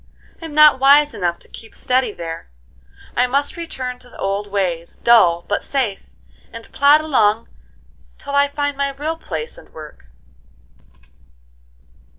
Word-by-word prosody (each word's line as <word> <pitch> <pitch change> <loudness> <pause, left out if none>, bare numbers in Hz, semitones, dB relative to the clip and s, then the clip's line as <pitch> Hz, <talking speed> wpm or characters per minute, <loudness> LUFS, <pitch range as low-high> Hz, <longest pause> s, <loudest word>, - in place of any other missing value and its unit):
I'm 320 -2 -8
not 300 -3 +7
wise 285 +2 +5
enough 175 -2 -2
to - - -17
keep 225 - -13
steady 255 -2 0
there; 165 - -8 0.7
I 250 +1 +2
must 280 +3 -1
return 260 -7 -6
to 250 - -16
the - - -15
old 200 +1 -2
ways, 180 -4 -3
dull 175 -8 +4
but 205 - -1
safe, 235 - -3 0.4
and 230 -1 -11
plod 290 +2 +5
along 225 -8 +1 0.7
till 280 - -8
I 280 0 +4
find 285 0 -3
my 280 0 -1
real 295 +4 -4
place 465 +9 -6
and - - -18
work." 150 - -12
255 Hz, 145 wpm, -19 LUFS, 200-285 Hz, 0.7 s, not